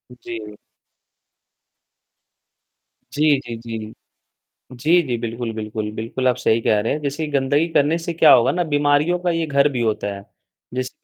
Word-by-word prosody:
जी। 110 -3 -8 2.6
जी, 150 -1 +3
जी, 120 -3 -7
जी। 110 -1 -7 0.8
जी, 155 +8 +3
जी, 120 -2 -1
बिल्कुल, 115 0 -4
बिल्कुल। 110 -1 -4
बिल्कुल, 115 +4 -2
आप 125 - +3
सही 110 +1 +1
कह 105 -1 +2
रहे 110 +5 -1
हैं। 150 - -4
जैसे 145 +2 -3
गंदगी 145 +3 +1
करने 150 +4 +3
से 170 0 -4
क्या 160 -2 +6
होगा 120 +1 +4
ना 175 - 0
बीमारियों 145 +4 +2
का 180 0 -1
ये 165 -1 -1
घर 140 -1 +3
भी 125 -4 -3
होता 110 -3 -1
है। 100 - -10 0.5
जैसे 130 0 -2
130 Hz, 160 wpm, -21 LUFS, 115-150 Hz, 2.6 s, क्या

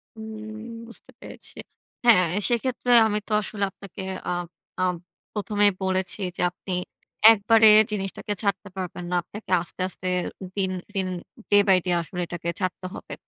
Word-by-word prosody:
হুম 220 0 -8 0.4
বুঝতে 235 - -9
পেরেছি। - - -8 0.5
হ্যাঁ 185 -7 +7 0.2
সেইক্ষেত্রে 245 +1 0 0.2
আমি 210 -1 0
তো - - -9
আসলে 205 -1 -3
আপনাকে 195 0 -10 0.3
আ - - +1 0.5
আপ 180 -1 +2 0.4
প্রথমেই 205 -1 +2
বলেছি 190 0 0 0.2
যে - - -2
আপনি 180 +1 -7 0.6
একবারে 220 +1 +5 0.2
জিনিসটাকে 195 0 -3
ছাড়তে 200 -1 -1
পারবেন 180 -1 -5
না, - - +1
আপনাকে 210 +2 -10
আস্তে, 175 - -8
আস্তে 185 - -6 0.5
দিন, 190 -2 0 0.2
দিন, 190 -1 0 0.4
day 205 0 +7
by 190 - +6
day 180 - +1
আসলে 175 +2 -7
এটাকে 170 0 -4
ছাড়তে 185 -1 -3
হবে। - - -8
200 Hz, 145 wpm, -25 LUFS, 185-215 Hz, 0.6 s, হ্যাঁ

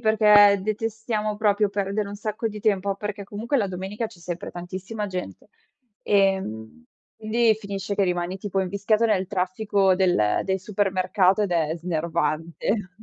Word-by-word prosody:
perché 210 -2 +6
detestiamo 215 0 -2
proprio 210 -1 +2
perdere 200 +1 -2
un 205 - -7
sacco 215 +2 -3
di 210 -1 -7
tempo, 200 -2 +1
perché 205 +1 -5
comunque 225 +8 -2
la 210 - +1
domenica 190 +5 -4
c'è 190 - -16
sempre 175 0 -6
tantissima 185 +5 -6
gente, 180 - -6 0.5
ehm, 190 - 0 0.3
quindi 225 +1 +2
finisce 200 -1 -4
che 200 - +1
rimani 180 +1 -2
tipo 195 0 -2
invischiato 200 +4 +1
nel 200 -4 +2
traffico 195 +1 +1
del 180 - +2
del 190 0 0
supermercato 190 0 +1
ed 200 - -1
è 160 -2 0
snervante. 170 +3 -2
200 Hz, 145 wpm, -24 LUFS, 185-210 Hz, 0.5 s, perché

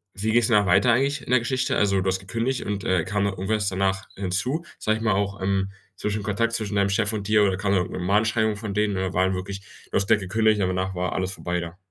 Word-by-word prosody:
wie 110 +3 -1
geht's 120 0 +4
danach 105 -4 +3
weiter 115 +7 +4
eigentlich 140 +4 +1
in - - -7
der 125 - +5
Geschichte? 125 +2 -1
Also, 100 -1 +2
du 95 - -2
hast 95 0 +1
gekündigt 115 +7 -2
und, 100 -2 -3
äh, 90 -3 +2
kam 105 -1 0
dann 100 - 0
irgendwas 100 +2 -1
danach 95 0 -1
hinzu, 100 - -2 0.2
sage 110 0 +1
ich 110 - -6
mal, 110 - +2
auch, 100 0 -1
ähm, 95 0 0 0.3
zwischen 105 0 -2
Kontakt 110 +3 0
zwischen 105 -3 -2
deinem 100 -1 +2
Chef 105 +2 +1
und 100 -2 -3
dir 105 -1 +4
oder 95 -2 +2
kam 100 0 -1
dann 95 - +3
irgendein 90 0 -4
Mahnschreibung 110 +2 +2
von 105 -1 -5
denen 105 -1 +1
oder 95 -1 -2
war 95 - +3
dann 95 0 0
wirklich 95 +1 -5 0.3
du - - -4
hast 100 - 0
da 110 - +7
gekündigt 105 +2 +1
und 95 - +2
danach 95 +1 -2
war 90 0 -1
alles 95 0 -2
vorbei 90 -2 -3
da? 85 0 -7
100 Hz, 260 wpm, -24 LUFS, 95-110 Hz, 0.3 s, da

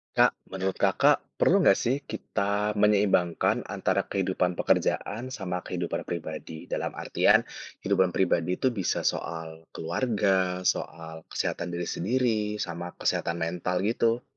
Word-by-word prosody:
Kak, - - +5
menurut 95 0 -3
Kakak, - - +4 0.2
perlu - - +5
nggak - - +6
sih 130 +4 +2
kita 100 +1 -1
menyeimbangkan 100 -5 +3
antara - - 0
kehidupan 95 -2 0
pekerjaan 115 +4 +1
sama 90 -7 -3
kehidupan 90 -1 -3
pribadi? 80 -1 -6
Dalam - - -2
artian - - +3 0.4
kehidupan 95 -2 +3
pribadi 90 -1 +2
itu 130 - +2
bisa 100 -6 -1
soal 80 -1 -3
keluarga, 95 -1 0
soal 80 -2 -2
kesehatan 85 0 -2
diri 85 0 -3
sendiri, 115 +3 +1 0.2
sama 85 +1 -5
kesehatan 85 0 0
mental 90 +2 -1
gitu? 115 +2 +1
90 Hz, 125 wpm, -27 LUFS, 85-105 Hz, 0.4 s, nggak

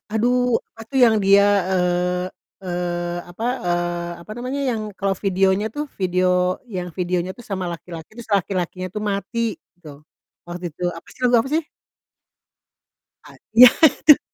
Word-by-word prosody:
aduh 245 +2 +2 0.2
apa - - -12
tuh 270 - +1
yang 225 -2 +4
dia, 200 +1 +6 0.3
eee 180 0 0 0.4
eee, 175 -1 -3
apa, 200 +6 -6 0.2
eee, 175 0 -1
apa 190 - -15
namanya, 255 +3 -3
yang 225 -2 -2 0.2
kalau 195 -1 0
videonya 195 +1 +2
tuh, 295 - -2 0.2
video 185 0 +1 0.5
yang 180 -1 -3
videonya 180 0 -1
tuh 240 - -11
sama 190 -2 -2
laki-laki 170 -1 -9
terus 235 -1 -11
laki-lakinya 185 -1 -3
tuh 210 - -3
mati 200 +2 -3 0.4
gitu, 175 -3 -14 0.6
waktu 175 +1 -7
itu 155 - -13
apa 165 - -12
sih - - -21
lagu 245 -1 +5
apa 265 - -4
sih? 325 - +2 1.6
A - - -14 0.2
ya 245 +2 +10
itu. 300 0 +7
190 Hz, 150 wpm, -21 LUFS, 175-225 Hz, 1.6 s, ya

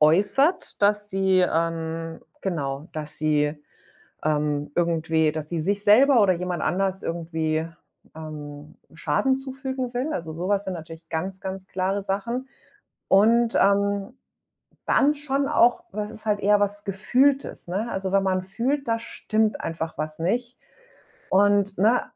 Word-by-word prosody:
äußert, 205 - +3
dass 205 0 +2
sie 190 -1 +2
ähm, 165 -1 -1 0.2
genau, 145 -4 -3
dass 150 -1 -6
sie 150 -1 0 0.6
ähm, 150 -1 0
irgendwie, 160 -2 +1
dass 155 -1 -5
sie 170 -1 -2
sich 200 +5 -1
selber 235 +4 +6
oder 190 -3 +4
jemand 180 -1 -3
anders 190 +1 0
irgendwie, 160 -1 -2 0.5
ähm, 150 -2 -9 0.2
Schaden 160 - +1
zufügen 265 -1 -5
will. 265 +6 -1
Also 165 - -4
so 175 +4 -4
was 200 0 +1
sind 190 - -3
natürlich 165 0 -10
ganz, 185 +4 -4
ganz 190 0 -6
klare 190 +2 -1
Sachen. 235 +7 -3 0.6
Und, 230 +4 +4
ähm, 200 +2 +2 0.7
dann 290 +2 +4
schon 280 -1 -1
auch, 285 +3 +3
was 210 0 -4
ist 215 0 -10
halt 205 -1 +1
eher 205 +1 +4
was 205 0 -1
Gefühltes, 255 +6 +1
ne? 200 +6 -2
Also 190 -1 -3
wenn 195 0 +4
man 185 -1 0
fühlt, 250 +9 -2
da 230 - +1
stimmt 220 -1 -1
einfach 160 0 -4
was 155 0 -4
nicht 240 +9 -2 0.7
und 200 0 +3
ne, 225 +6 +4
195 Hz, 145 wpm, -24 LUFS, 160-220 Hz, 0.7 s, selber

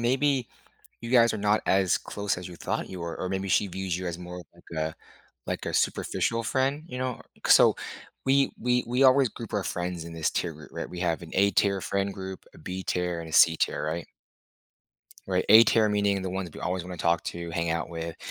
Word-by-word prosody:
maybe 130 +1 +1 0.5
you 115 - -6
guys 115 -2 +5
are 110 - -2
not 105 +1 +2
as 95 -2 +3
close 100 -3 -3
as 90 - -6
you 90 - -10
thought - - -3
you 95 - -7
were, 85 -1 -5
or 95 - -2
maybe 95 +1 -2
she 100 - +3
views 95 -1 -3
you 90 - -5
as 85 -1 -3
more 90 0 -8 0.2
like - - -20 0.2
a 80 0 -3 0.5
like - - -3
a - - -3
superficial 115 0 0
friend, 135 +5 0
you 125 - -6
know? 130 -2 -3 0.2
C - - +4
So, - - +7 0.5
we 135 0 +3
we 125 +1 +1
we 125 +3 +2
always 130 -1 +6
group 115 -2 -9
our 105 - 0
friends 90 -2 -3
in 85 - -8
this 80 -2 0
tier 85 -3 -2
group, 80 +1 -13
right? - - -5
We 90 - -7
have 85 -2 0
an 80 -2 -10
A-tier 100 0 +2
friend 100 0 -1
group, 95 -1 -7
a - - -16
B-tier, 90 0 -2
and 80 - -8
a - - -9
C-tier, 80 +1 +4
right? 80 +2 -3 1.2
Right? 90 -1 +1
A-tier, 110 0 +7
meaning 100 -2 +1
the 95 - -3
ones 95 0 -3
that - - -20
we - - -9
always 90 +1 -1
wanna 90 -1 -7
talk 85 0 +1
to, 85 0 -5
hang 85 0 -1
out 85 - -1
with. 85 0 -5
95 Hz, 220 wpm, -27 LUFS, 85-115 Hz, 1.2 s, So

